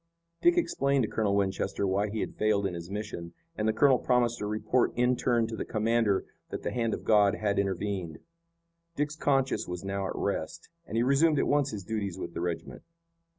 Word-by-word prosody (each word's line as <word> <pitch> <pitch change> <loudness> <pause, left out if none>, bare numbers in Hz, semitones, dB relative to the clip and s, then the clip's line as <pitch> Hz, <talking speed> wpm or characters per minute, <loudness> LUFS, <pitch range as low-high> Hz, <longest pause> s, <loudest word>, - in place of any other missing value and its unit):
Dick 345 +1 +4
explained 140 - +2
to - - 0
Colonel 105 -2 0
Winchester 95 0 0
why 100 +2 +1
he 110 +1 -3
had - - -3
failed 105 -2 +1
in 95 - -1
his 85 0 -7
mission, 100 -5 -5 0.2
and 105 - -1
the - - +4
colonel 130 +4 +4
promised 120 -2 +1
to 105 - -3
report 110 +4 +1
in 125 +1 +3
turn 120 -1 +1
to 110 0 -5
the - - -3
commander 110 -2 +1 0.2
that - - -5
the - - -2
hand 115 -2 0
of - - -10
God 105 -2 +4
had 100 -2 0
intervened. 95 -4 -2 0.8
Dick's 150 0 -1
conscience 135 -4 +1
was 90 0 -5
now 100 0 -2
at - - -5
rest, 100 +10 -3 0.2
and 110 - -3
he 115 - +3
resumed 145 +4 +3
at - - +2
once 145 -1 +2
his 105 -5 -6
duties 100 -3 -3
with 90 - -6
the - - -4
regiment. 85 -1 -4
110 Hz, 205 wpm, -29 LUFS, 100-125 Hz, 0.8 s, Dick